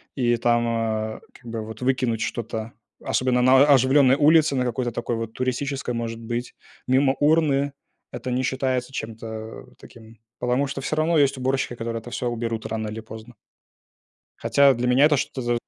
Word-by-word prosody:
и 120 -3 +2
там, 120 0 +2
а, 110 -1 -2
как - - -19
бы 115 -1 -3
вот 110 +1 -9
выкинуть 125 -3 0
что-то, 115 -1 -4 0.3
особенно 125 -1 +1
на 130 +2 +6
а 145 - +6
оживленной 130 +1 +4
улице, 155 0 +4
на 130 - +1
какой-то 120 0 -2 0.4
туристической, 130 +3 -3
может 115 -1 -4
быть, 120 +1 -5 0.3
мимо 135 +1 +3
урны 145 -2 +2 0.4
это 130 - -5
не 125 +1 0
считается 130 -1 -1
чем-то 110 -1 -7
таким. 115 -1 -15 0.2
Потому 125 +3 0
что 135 0 -5
всё 145 - -2
равно 160 +2 +2
есть 140 -2 +3
уборщики, 130 -1 -1
которые 115 0 -4
это 120 - -10
всё 125 - -2
уберут 115 -1 -3
рано 110 -1 -3
или 110 +1 -6
поздно. 110 +2 -11 1.0
Хотя 140 -1 +4
для 125 +1 -2
меня 130 +3 +5
это 150 -1 +3
что-то, 120 -2 -2
125 Hz, 165 wpm, -23 LUFS, 115-135 Hz, 1.0 s, на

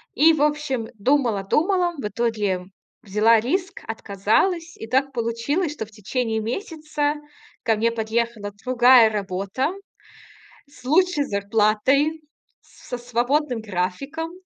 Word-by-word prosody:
И, 320 +2 +6
в 300 - -1
общем, 295 -6 0
думала, 230 -3 +1
думала. 350 - +1
В 210 - -3
итоге 210 -4 -1 0.4
взяла 215 +3 +4
риск, 360 - -2
отказалась. 225 - 0
И 225 - -8
так 270 +3 +1
получилось, 245 +8 -1
что 220 - -5
в 215 - -20
течение 220 +2 -2
месяца 300 - -2 0.5
ко 225 - +2
мне 230 +2 +1
подъехала 225 -2 -2
другая 245 -2 +6
работа 200 - -2 1.0
с 255 -3 -18
лучшей 315 +1 +3
зарплатой, 220 +10 +1 0.4
с - - -19
со 245 - -4
свободным 245 +2 0
графиком. 220 - -3
240 Hz, 120 wpm, -23 LUFS, 215-295 Hz, 1.0 s, И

